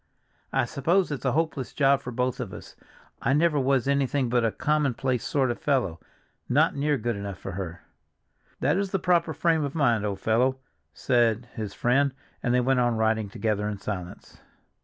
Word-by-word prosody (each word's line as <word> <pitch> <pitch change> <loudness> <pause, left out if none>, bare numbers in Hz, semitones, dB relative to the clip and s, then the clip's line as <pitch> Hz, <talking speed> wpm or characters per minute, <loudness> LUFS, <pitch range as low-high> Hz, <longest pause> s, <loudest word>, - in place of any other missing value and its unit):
I 135 -1 +2
suppose 165 +9 +1
it's 140 -3 -4
a 130 - +2
hopeless 155 -4 -1
job 140 -1 +3
for 125 - -6
both 125 +1 -1
of - - -5
us. - - -10 0.5
I 135 - +2
never 150 0 +3
was 135 -1 +1
anything 140 -2 +1
but 120 0 +2
a 115 - +2
commonplace 135 -4 0
sort 135 -4 +1
of 120 - -5
fellow, 120 - 0 0.5
not - - +3
near 145 +1 +1
good 120 -1 -2
enough 100 -1 -5
for 95 - -7
her." 90 -2 -6 0.8
"That 145 +6 +2
is 200 0 -1
the 195 - 0
proper 170 -2 +2
frame 160 +1 +1
of 140 +1 -4
mind, 120 -8 +2
old 100 -2 -2
fellow," 125 +6 +2 0.3
said 115 - +1
his 105 -3 -5
friend, 135 +2 +2 0.3
and 120 - 0
they 125 0 +3
went 130 +1 +2
on 120 -2 +2
riding 110 -1 +1
together 105 0 -1
in 105 - -4
silence. 100 -3 -7
125 Hz, 185 wpm, -26 LUFS, 110-140 Hz, 0.8 s, job